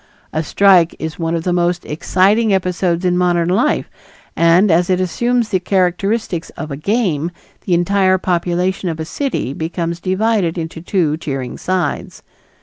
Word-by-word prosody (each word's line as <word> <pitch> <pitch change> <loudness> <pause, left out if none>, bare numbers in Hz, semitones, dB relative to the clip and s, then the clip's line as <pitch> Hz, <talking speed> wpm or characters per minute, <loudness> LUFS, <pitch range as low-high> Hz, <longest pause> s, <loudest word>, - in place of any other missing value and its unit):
A 155 - 0
strike 180 +1 +4
is 160 +1 -6
one 165 0 -1
of 165 - -2
the 180 - 0
most 175 0 0
exciting 195 +8 +2
episodes 180 -1 -1
in 180 -1 +2
modern 175 -1 +1
life, 235 +11 +1 0.5
and 170 +4 +4
as 175 +2 +2
it 185 -1 +2
assumes 235 +5 0
the 190 - +1
characteristics 185 0 -1
of 155 -1 -6
a - - -3
game, 170 - 0 0.4
the 180 - +2
entire 185 +2 +2
population 180 +1 -1
of 160 -1 -4
a 160 - -3
city 255 - -3
becomes 170 +2 -3
divided 190 -2 0
into 160 0 -5
two 165 -4 0
cheering 135 -5 -4
sides. 185 -1 -3
180 Hz, 155 wpm, -17 LUFS, 165-190 Hz, 0.5 s, strike